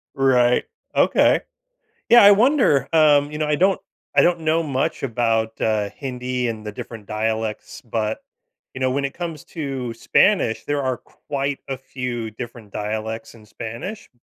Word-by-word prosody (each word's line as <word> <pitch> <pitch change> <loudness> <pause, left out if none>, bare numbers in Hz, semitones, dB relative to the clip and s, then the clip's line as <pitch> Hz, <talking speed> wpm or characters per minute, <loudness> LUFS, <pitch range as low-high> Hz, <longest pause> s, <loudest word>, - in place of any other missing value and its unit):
Right. 125 -2 +3 0.3
Okay. - - +4 0.7
Yeah, 240 -3 +8
I 205 - +10
wonder, 215 - +4
um, 150 -2 +5
you 150 - -5
know, 155 - 0
I 150 - +2
don't 190 +4 +3 0.4
I - - +7
don't 175 -1 +3
know 160 +1 +1
much 135 -3 -2
about, 115 -3 +1
uh, 105 -2 +1
Hindi 125 -2 -3
and 110 -2 -5
the 105 - -4
different 105 0 -9
dialects, 110 0 -3
but, 110 -1 -2 0.5
you 130 - -7
know, 130 - +2
when 140 +2 0
it 135 - -4
comes 165 -4 -6
to 135 -7 -4
Spanish, 120 - +2
there 145 -1 0
are 130 -2 -1
quite 140 -1 -4
a 135 - -3
few 125 -4 -5
different 115 -2 -9
dialects 110 +2 -4
in 110 -2 -16
Spanish. 115 - -7
130 Hz, 160 wpm, -22 LUFS, 110-145 Hz, 0.7 s, I